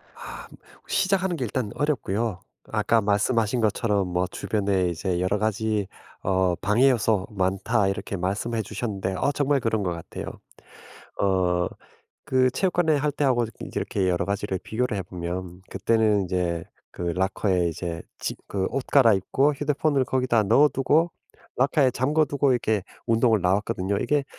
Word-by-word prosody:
아 - - -9 0.4
시작하는 190 -2 +1
게 130 - -2
일단 115 -2 -3
어렵고요. 115 -8 -1 0.3
아까 110 +1 +2
말씀하신 105 +3 +1
것처럼 105 -2 +1
뭐 90 +1 0
"주변에 100 -3 0
이제 85 +2 -2
여러 95 +3 +1
가지 110 -1 0 0.4
어 95 -2 +2
방해 105 +10 +3
요소 110 -5 +1
많다." 100 +2 +1
이렇게 100 0 -3
말씀을 100 +6 -2
해 - - +1
주셨는데 105 -3 -3
어 140 - +1
정말 145 -1 +1
그런 110 -3 0
것 90 - -1
같아요. 85 -1 -7 1.0
어 90 -3 +2 0.6
그 130 -1 +4
체육관에 175 0 +1
할 145 +1 +1
때 145 0 -1
하고 120 -3 +2
저기 110 - -10
이렇게 95 - -1
여러 90 0 0
가지를 100 -1 -2
비교를 110 -2 -2
해 95 - -2
보면 90 +1 -6
그때는 105 0 +2
이제 90 -2 -1 0.3
그 - - -8
라커에 95 -1 +1
이제 85 0 -5 0.2
지 - - -3
그 95 -1 -1
옷 135 - -3
갈아입고 135 +3 +3
휴대폰을 145 -1 +1
거기다 125 -3 +1
넣어두고 145 - +3 0.5
라커에 135 +1 +3
잠가두고 140 +1 +1
이렇게 110 -4 +1 0.2
운동을 115 -1 +3
나왔거든요. 95 +1 0
이게 145 +3 +1
105 Hz, 325 characters per minute, -25 LUFS, 95-130 Hz, 1.0 s, 그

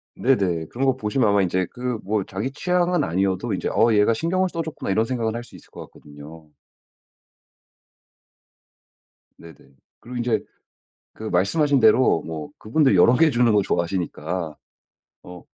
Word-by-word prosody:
네네. 95 -11 +1
그런 130 +9 -3
거 135 -1 +2
보시면 110 0 0
아마 100 0 +3
인제 95 0 0
그 125 -1 -4
뭐 105 0 -1
자기 100 +8 -4
취향은 180 +2 0
아니어도 95 0 -1
이제 - - -2
'어 115 0 +3
얘가 105 +2 +3
신경을 185 +9 0
써 170 - -4
줬구나.' 160 -10 -5
이런 110 +3 +2
생각은 115 -2 -2
할 120 - -5
수 120 - -17
있을 - - -16
것 - - -10
같거든요. 75 +2 -14 2.9
네네. 85 -1 -14 0.4
그리고 125 +1 -8
인제 120 -3 -1 0.7
그 110 - -10
말씀하신 135 - +1
대로 110 -5 +4
뭐 80 -2 -6
그분들 130 0 +2
여러 105 +7 +5
개 160 +3 +4
주는 120 -3 +2
걸 105 -1 +3
좋아하시니까 85 -2 -3 0.7
어 90 -1 -11
110 Hz, 310 characters per minute, -22 LUFS, 90-130 Hz, 2.9 s, 여러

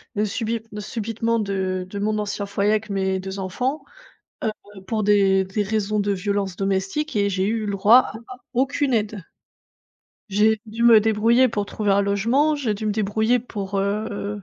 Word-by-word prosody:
de 210 +1 +1
subit 225 +2 -2 0.2
subitement 225 +2 -2
de 190 -2 -2
de 200 - -5
mon 215 +1 0
ancien 205 -1 -3
foyer 200 +1 0
avec 215 0 0
mes 190 -1 0
2 190 +1 -6
enfants, 255 +10 -2 0.9
heu, 190 - -11
pour 215 +1 -2
des 195 -2 +4
des 200 +2 -2
raisons 215 0 -1
de 205 0 +1
violences 200 0 -2
domestiques 195 +10 -2
et 200 -1 +2
j'ai 190 0 0
eu 220 -1 -1
le 205 - -2
droit 205 +5 +6 0.3
à 255 - -8 0.2
aucune 265 +1 +1
aide. 210 -4 -2 1.1
J'ai 210 +2 +3
dû 225 +2 -4
me 235 -2 +8
débrouiller 225 +4 +3
pour 205 -3 -2
trouver 205 -1 -1
un 200 +1 +3
logement, 235 +10 +2
j'ai 235 -7 -1
dû 215 +2 -6
me - - +1
débrouiller 220 +3 +1
pour, 200 -4 -5
heu, 205 0 -2
210 Hz, 175 wpm, -22 LUFS, 200-225 Hz, 1.1 s, me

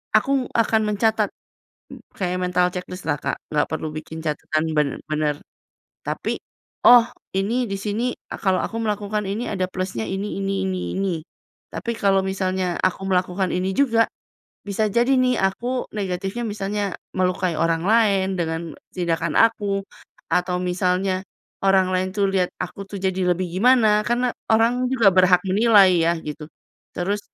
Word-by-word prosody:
aku 260 +4 +2
akan 225 -1 +2
mencatat 215 0 +2 0.9
kayak 180 -1 -1
mental 180 0 +2
ceklis 180 0 -6
lah 145 - +2
Kak, - - -2
nggak 150 -1 +1
perlu 160 0 -3
bikin 160 +1 -7
catatan 155 0 -1
benar-benar. 150 +1 0 0.7
Tapi, - - -2 0.5
"Oh, 245 0 +10 0.3
ini 225 +6 +1
di 195 - -2
sini 225 +5 -1 0.2
kalau 190 -2 0
aku 230 - -4
melakukan 210 -1 -2
ini 215 +5 -2
ada 185 -3 0
plusnya 185 -13 -3
ini 195 +2 -3
ini 195 0 -1
ini 185 -1 -2 0.2
ini." 195 -2 0 0.6
Tapi 235 - -3
kalau 195 -2 +3
misalnya 185 -2 -1
aku 185 +1 0
melakukan 185 0 +1
ini 185 +1 0
juga, 230 -5 +4 0.6
bisa 210 +2 0
jadi 240 +4 +3
nih 255 -1 +3
aku 240 +7 -1
negatifnya 195 +3 -3
misalnya 205 -1 -2 0.2
melukai 185 -1 +1
orang 165 +1 +1
lain, 200 -4 +3
dengan 165 -1 -3 0.2
tindakan 170 -2 -1
aku, 205 -3 +3 0.5
atau 180 0 +1
misalnya 185 +1 0 0.4
orang 190 -1 +4
lain 185 0 +1
tuh 200 -1 +2
lihat 185 -2 +1
aku 180 +2 -5
tuh 200 - -6
jadi 185 -1 +1
lebih 185 +1 -2
gimana. 215 +1 +4
Karena 245 +1 +1 0.2
orang 235 +3 +3
juga 235 -6 +5
berhak 185 -1 +5
menilai 200 -2 +5
ya 165 +1 +3
gitu. 150 0 -7 0.5
Terus 200 +4 -1
195 Hz, 145 wpm, -22 LUFS, 180-215 Hz, 0.9 s, Oh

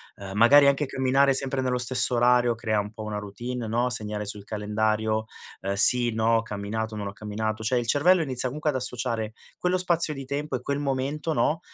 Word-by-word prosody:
Uhm, 95 -1 -9
magari 140 +6 +7
anche 140 +1 +2
camminare 135 +1 +2
sempre 135 0 0
nello 125 -1 0
stesso 125 0 +1
orario 120 0 +3
crea 110 -2 -1
un 105 0 -4
po' 110 0 -8
una 105 -1 -4
routine, 120 +4 -5
no, 120 +3 0
segnare 105 -3 -3
sul 105 0 -7
calendario, 110 +1 -1 0.4
uhm, 100 +1 -2
sì, 120 +4 +4
no, 115 +1 +2
ho - - +1
camminato, 110 +1 -4
non 105 - -4
ho 100 - -6
camminato, 110 +1 -4
cioè 125 +3 +1
il 120 -1 -2
cervello 170 +7 +4
inizia 130 -4 0
comunque 150 +5 -7
ad - - -7
associare 120 -3 -3 0.3
quello 180 +1 +1
spazio 170 -4 0
di 135 - -7
tempo 140 +1 -3
e 125 - -4
quel 140 +1 -2
momento, 140 +3 -2
no, 155 +1 +1
120 Hz, 205 wpm, -26 LUFS, 110-135 Hz, 0.4 s, magari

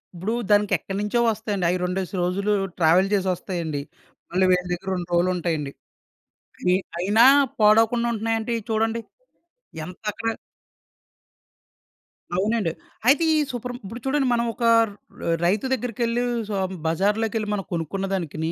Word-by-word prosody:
ఇప్పుడు 190 +6 -2 0.2
దానికెక్కడినుంచో 205 +2 +1
వస్తాయండి. 210 -4 -2
అయి 180 - +1
రెండేసి 180 +1 -2
రోజులు 200 +4 0 0.3
ట్రావెల్ 175 +4 +4
చేసొస్తాయండి. 180 -5 -1 0.5
మళ్ళీ 185 +1 +3
వీళ్ళ 180 0 +3
దగ్గర 185 +2 -3
2 175 -1 -5
రోజులుంటాయండి. 170 -5 0 1.3
అయినా 205 +6 +4 0.4
పాడవకుండా 225 +3 +4
ఉంటున్నాయండి 225 +1 -1
చూడండి 225 +1 0 0.8
ఎంత 180 +5 -11
క 225 0 -1 2.0
అవునండి. 210 -2 +1 0.4
అయితే 290 +6 +5
ఈ - - +3
సూపర్ 245 0 -5
ఇప్పుడు 225 +5 -8
చూడండి, 270 0 +1
మనమొక 235 0 -1 0.3
ర - - -11 0.5
రైతు 200 +7 +1
దగ్గరికెళ్ళి 240 0 -1 0.3
స - - -4 0.4
బజార్‌లోకెళ్ళి 210 +5 0
మనం 200 -2 -2
కొనుక్కున్న 175 +4 -2
దానికిని 160 -3 -2
205 Hz, 110 wpm, -24 LUFS, 180-225 Hz, 2.0 s, అయితే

